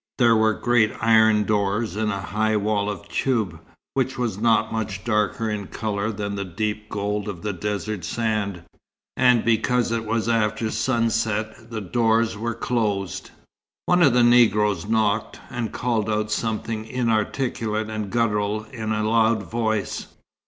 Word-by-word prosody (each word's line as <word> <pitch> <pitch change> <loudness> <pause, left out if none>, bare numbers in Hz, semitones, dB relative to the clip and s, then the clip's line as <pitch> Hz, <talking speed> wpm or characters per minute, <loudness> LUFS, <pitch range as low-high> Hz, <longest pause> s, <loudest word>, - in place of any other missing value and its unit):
There 120 -3 +5
were 110 -1 +3
great 120 +1 +2
iron 110 -1 +5
doors 105 -1 0
in 110 0 0
a 100 -2 -2
high 110 +2 0
wall 105 0 0
of 100 -4 -6
toub, 115 -8 -1 0.3
which 130 -1 -1
was 115 -5 -2
not 115 0 +2
much 105 -3 -3
darker 105 0 0
in 105 -3 -3
colour 105 0 -2
than 100 -1 -4
the 100 0 -3
deep 105 +3 -3
gold 105 0 -2
of 90 -5 -7
the 105 -1 -2
desert 105 +1 -3
sand; 100 -2 -2 0.5
and 125 -2 +4
because 115 +1 +2
it 115 -1 -1
was 115 +1 -1
after 110 -1 +1
sunset 110 -1 -1
the 115 -2 -4
doors 115 +2 +1
were 115 +3 -3
closed. 105 -6 -2 0.6
One 180 0 +3
of 140 -7 +6
the 125 -1 +4
Negroes 105 -6 +4
knocked, 110 -1 0
and 120 -3 -3
called 115 -3 -1
out 105 0 -1
something 110 0 -2
inarticulate 110 -1 -1
and 110 -2 -4
guttural 105 -2 0
in 110 -3 -3
a 110 0 0
loud 110 -1 +3
voice. 110 +1 -2
110 Hz, 150 wpm, -23 LUFS, 105-115 Hz, 0.6 s, of